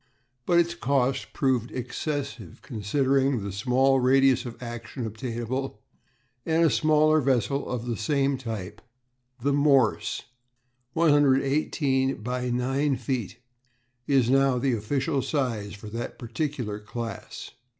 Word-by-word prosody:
But 175 - +4
its 170 0 +2
cost 135 -4 0
proved 130 -4 0
excessive 125 - -5
considering 135 +1 +1
the 100 - -4
small 130 +6 +2
radius 130 0 +4
of 120 - -8
action 120 +1 -6
obtainable, 120 +3 -4 0.6
and 165 +1 +2
a 160 - +4
smaller 155 +6 +4
vessel 135 +1 0
of 120 -2 -3
the 120 -1 -2
same 140 +5 +1
type, 110 -4 -6 0.6
the 140 0 +2
Morse 140 -2 +2 0.7
(118 140 -3 +2
× 125 +1 -2
9 135 +3 +1
feet), 120 -5 -3 0.7
is 135 -4 +3
now 135 0 +3
the 130 +1 +1
official 135 +6 -1
size 115 -8 -2
for 105 +1 -11
that 115 +2 -5
particular 125 -4 -3
class. 115 0 -7
130 Hz, 120 wpm, -26 LUFS, 115-140 Hz, 0.7 s, But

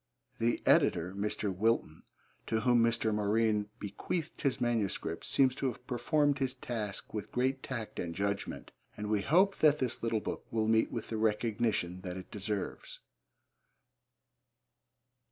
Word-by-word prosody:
The 115 +1 +1
editor, 85 +2 +3
Mr. 100 -1 -2
Wilton, 110 -5 +1 0.5
to 110 0 +1
whom 120 -1 +4
Mr. 115 -1 +2
Morine 105 0 +1
bequeathed 155 - -4
his 140 -3 +1
manuscripts, 115 -5 -1
seems 130 -2 +4
to 135 +1 -1
have 125 0 -5
performed 145 +3 +1
his 130 -1 -1
task 110 -6 -5
with 105 -1 -4
great 130 +2 0
tact 120 -5 -5
and 85 -1 -3
judgment, 100 0 -2 0.3
and 105 0 -3
we 105 -2 +2
hope 185 - +4
that 150 -1 +5
this 130 -5 -2
little 115 -1 +1
book - - -5
will 110 -1 0
meet 110 0 +3
with 115 - -4
the 110 - -2
recognition 110 -4 0
that 90 -1 -5
it 95 - -9
deserves. 105 -1 -4
110 Hz, 145 wpm, -32 LUFS, 105-125 Hz, 0.5 s, that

